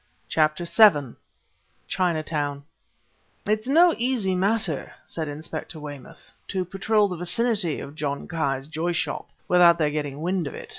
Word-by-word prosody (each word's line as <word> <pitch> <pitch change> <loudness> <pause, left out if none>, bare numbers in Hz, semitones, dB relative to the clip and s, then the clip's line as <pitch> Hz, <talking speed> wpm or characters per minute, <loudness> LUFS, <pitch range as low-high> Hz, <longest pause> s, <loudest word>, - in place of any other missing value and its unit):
CHAPTER 155 +2 +1
VII 170 - +5 0.7
CHINATOWN 155 -5 -1 0.8
"It's 215 +2 0
no 335 +5 +5
easy 235 -6 +1
matter," 190 -4 -1
said 160 -2 -4
Inspector 155 +2 -7
Weymouth, 145 -3 -10 0.2
"to 185 -2 -2
patrol 205 +3 +1
the 180 -3 -5
vicinity 185 -1 +1
of 140 - -8
John 145 -2 -4
Ki's 135 -5 -2
Joy 160 +3 -2
Shop 160 -3 -2 0.2
without 175 -1 +6
their 150 -3 +1
getting 145 -1 -4
wind 180 -2 -1
of - - -7
it. - - -9
170 Hz, 140 wpm, -24 LUFS, 150-195 Hz, 0.8 s, without